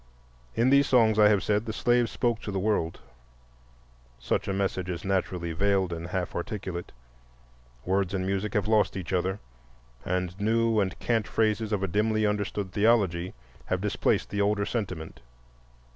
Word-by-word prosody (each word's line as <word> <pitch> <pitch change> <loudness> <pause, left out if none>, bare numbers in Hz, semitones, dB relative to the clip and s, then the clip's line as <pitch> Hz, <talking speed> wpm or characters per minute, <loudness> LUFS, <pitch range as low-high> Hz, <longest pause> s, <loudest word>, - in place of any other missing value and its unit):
In 120 +3 +3
these 140 0 +5
songs, 110 -4 +4
I 105 - +8
have 105 -1 +3
said, 105 +1 0
the - - -1
slave 120 0 +2
spoke 120 +1 -1
to 105 - -5
the 95 - -2
world. 95 -4 -1 1.2
Such - - -1
a - - 0
message 95 -2 -1
is 85 0 -4
naturally 90 -3 -1
veiled 95 0 +1
and 85 0 -5
half 90 0 -3
articulate. 90 -2 -5 0.9
Words 95 +1 0
and 95 -1 -1
music 100 +3 -2
have 105 -1 +1
lost 110 -2 +2
each 95 0 -5
other 95 +2 0 0.7
and 90 +1 -2
new 115 +1 +2
and 95 -2 -1
cant 115 -3 0
phrases 110 0 0
of 100 -2 0
a - - +1
dimly 110 +3 +1
understood 105 -2 -2
theology 100 -5 +2 0.3
have - - -1
displaced - - 0
the 100 +1 0
older 100 0 +1
sentiment. 100 -8 -4
100 Hz, 160 wpm, -27 LUFS, 95-110 Hz, 1.2 s, I